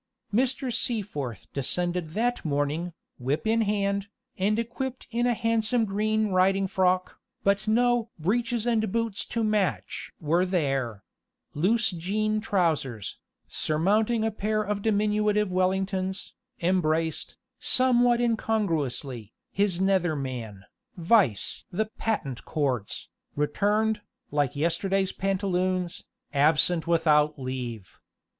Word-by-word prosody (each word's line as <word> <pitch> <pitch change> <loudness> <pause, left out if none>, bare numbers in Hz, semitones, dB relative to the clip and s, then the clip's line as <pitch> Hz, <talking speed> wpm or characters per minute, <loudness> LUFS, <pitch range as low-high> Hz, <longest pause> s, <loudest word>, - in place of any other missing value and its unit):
Mr. 255 +2 +1
Seaforth 190 - -2
descended 175 +4 -1
that 245 +3 0
morning, 150 +3 -1 0.3
whip 135 - -1
in 225 +1 +3
hand, 200 -1 0 0.3
and 210 +2 +1
equipped 250 +3 -4
in 240 +1 +1
a 240 - +2
handsome 230 +1 +1
green 215 +1 0
riding 195 +1 +3
frock, 185 -1 +1 0.2
but 200 +2 +2
no 240 +1 +2
"breeches 230 +7 0
and 220 -4 +1
boots 230 -2 -1
to 230 - -2
match" 215 -3 -1
were 170 +3 +2
there: 135 - -1 0.5
loose 220 +8 +2
jean 215 +5 -1
trousers, 155 - -1 0.3
surmounting 210 +9 +1
a 225 - +1
pair 215 +1 -1
of 205 0 -2
diminutive 210 -1 +2
Wellingtons, 190 +1 -1 0.3
embraced, 165 -3 0 0.2
somewhat 245 -2 +4
incongruously, 155 - -1 0.2
his 200 -3 +1
nether 190 -4 +2
man, 120 -8 -5 0.3
vice 170 - +2
the 215 +5 0
"patent 140 - -2
cords," 130 -9 -2 0.3
returned, 210 +9 +1 0.3
like 145 -3 +1
yesterday's 185 +5 0
pantaloons, 185 -2 -1 0.3
absent 155 +4 +3
without 155 -3 +3
leave. 125 -6 -6
190 Hz, 110 wpm, -27 LUFS, 155-215 Hz, 0.5 s, somewhat